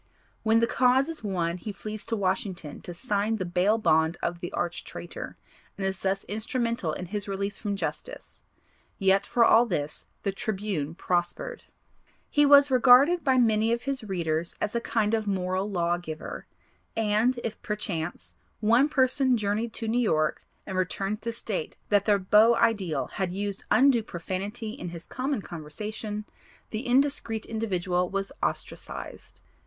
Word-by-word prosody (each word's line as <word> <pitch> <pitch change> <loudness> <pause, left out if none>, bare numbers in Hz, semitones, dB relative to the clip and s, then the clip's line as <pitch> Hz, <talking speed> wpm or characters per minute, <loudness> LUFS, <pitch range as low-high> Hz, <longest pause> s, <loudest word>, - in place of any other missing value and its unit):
When 225 +1 +3
the - - +5
cause 255 +4 +3
is 325 -6 -6
won 175 -4 -1
he 210 +4 -6
flees 215 +1 -7
to 230 - 0
Washington 190 - -2
to - - -7
sign 205 +3 -1
the 190 -4 -3
bail 180 +5 +2
bond 160 -5 +2
of 170 0 -1
the 175 -1 -5
arch 175 0 -2
traitor, 175 - -8 0.4
and 195 - -2
is 190 -2 -2
thus 195 0 -1
instrumental 230 -3 -2
in 180 - -5
his 205 +3 -4
release 200 +1 -3
from 205 -2 -2
justice. - - -6 0.6
Yet, 195 0 +3
for 235 -1 +4
all 235 +2 +6
this 150 -7 -2 0.2
the 200 - 0
Tribune 195 -7 -3
prospered. 185 - -2 0.7
He 290 -1 +4
was 285 0 +8
regarded 265 +7 +6
by 265 -3 +3
many 225 -2 +3
of 235 +1 0
his 275 -3 -2
readers 170 -4 -1
as 210 - -2
a 235 - 0
kind 220 -2 0
of 220 -2 0
moral 190 0 -1
law 175 -3 +1
giver, 155 -3 -7 0.5
and 225 +3 +2
if, 225 - -4
per 210 - -2
chance, 160 - -4 0.3
one 235 +7 +4
person 260 -2 +3
journeyed 215 +2 -1
to 225 - -4
New 240 +3 +2
York 155 -9 +1 0.2
and 190 -1 -2
returned 195 +3 -2
to 230 - -2
state 210 -7 -4
that 205 -1 +3
their 205 -2 +4
beau 210 +5 +5
ideal 210 -9 +1
had 190 -3 -3
used 200 +1 -3
undue 265 -3 +5
profanity 205 +4 -4
in 195 -7 -6
his 170 0 -9
common 260 -4 -2
conversation, 210 +7 -5 0.5
the 220 +4 -3
indiscrete 245 -4 +1
individual 185 -5 -1
was 195 0 -2
ostracised. - - -5
210 Hz, 160 wpm, -27 LUFS, 180-230 Hz, 0.7 s, was